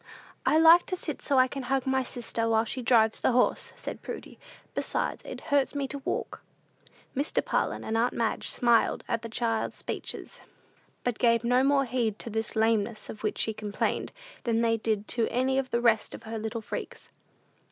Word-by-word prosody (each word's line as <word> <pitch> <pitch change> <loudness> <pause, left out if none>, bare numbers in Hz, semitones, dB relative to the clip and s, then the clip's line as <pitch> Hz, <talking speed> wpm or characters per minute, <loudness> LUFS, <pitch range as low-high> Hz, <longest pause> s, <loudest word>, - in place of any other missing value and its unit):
"I 310 - +5
like 330 +2 +7
to 370 - -1
sit 320 -4 -5
so 280 - +1
I 255 0 +6
can 275 +1 -5
hug 265 +1 0
my 265 0 +2
sister, 230 -2 -3
while 225 0 +3
she 255 +3 -3
drives 225 -2 +4
the - - +2
horse," 250 - +2
said - - -7
Prudy; - - -8 0.3
"besides, - - -2
it - - -7
hurts 285 0 +3
me 280 -1 -1
to 280 - -5
walk." - - -3 0.7
Mr. 280 +3 0
Parlin - - 0
and 220 - -2
aunt 235 +2 +2
Madge 225 -2 -1
smiled 235 -2 +2
at 230 - -1
the 230 - -6
child's 225 0 -1
speeches, - - -6 0.6
but 245 -3 -1
gave 230 -1 +3
no 245 +2 +3
more 275 0 +3
heed 230 -4 -1
to 230 - -6
this 220 +2 -3
lameness 220 0 +1
of 215 - -11
which 215 - -1
she 220 - +1
complained, 210 -1 -2 0.3
than 230 -1 +1
they 230 -1 +3
did 215 -2 -1
to 230 -2 +1
any 265 +2 +1
of 265 -1 -3
the 235 - 0
rest 230 -3 +2
of - - -12
her 225 0 -5
little 220 +1 -4
freaks. - - -7
235 Hz, 195 wpm, -28 LUFS, 225-260 Hz, 0.7 s, like